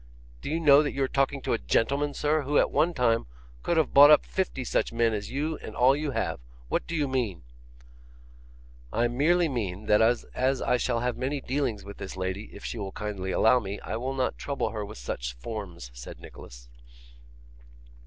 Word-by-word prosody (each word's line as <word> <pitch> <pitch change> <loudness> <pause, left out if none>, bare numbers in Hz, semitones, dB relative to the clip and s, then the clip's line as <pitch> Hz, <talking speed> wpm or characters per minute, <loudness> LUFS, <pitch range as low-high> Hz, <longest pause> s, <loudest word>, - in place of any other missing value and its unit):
Do - - -5
you 160 +2 0
know 145 -3 +7
that 145 - -2
you 140 - 0
are - - +1
talking 135 0 0
to - - 0
a 115 - 0
gentleman, 140 +5 0
sir, 150 +1 +1
who 145 +1 0
at - - +3
one 155 +5 +2
time 115 - +1 0.3
could 170 - 0
have 160 -4 +1
bought 145 +1 +9
up 150 - +6
fifty 185 -8 -2
such - - 0
men 115 -1 +1
as 105 -1 -4
you 150 +4 -2
and 110 - -9
all 130 +2 +5
you 150 0 -2
have? 135 - -2 0.3
What - - -1
do 170 - -3
you 150 -3 +1
mean?' 120 - -2 1.5
'I 120 +1 +1
merely 165 +8 +2
mean 105 - -4
that 105 +1 +4
as 125 +3 +1
I 125 - +2
shall 120 -1 -1
have 125 0 -1
many 135 +3 -2
dealings 130 -7 -2
with 100 - -9
this 95 - -7
lady, 95 +3 -3
if - - -11
she 115 - -4
will 100 -1 -4
kindly 100 -3 -4
allow 110 +6 +4
me, 100 -2 -6
I - - -4
will 130 +4 -3
not 130 -1 -1
trouble 140 -6 -2
her 105 -1 -4
with 100 - -9
such - - -4
forms,' 85 - -7
said - - -10
Nicholas. - - -12
125 Hz, 205 wpm, -27 LUFS, 105-140 Hz, 1.5 s, bought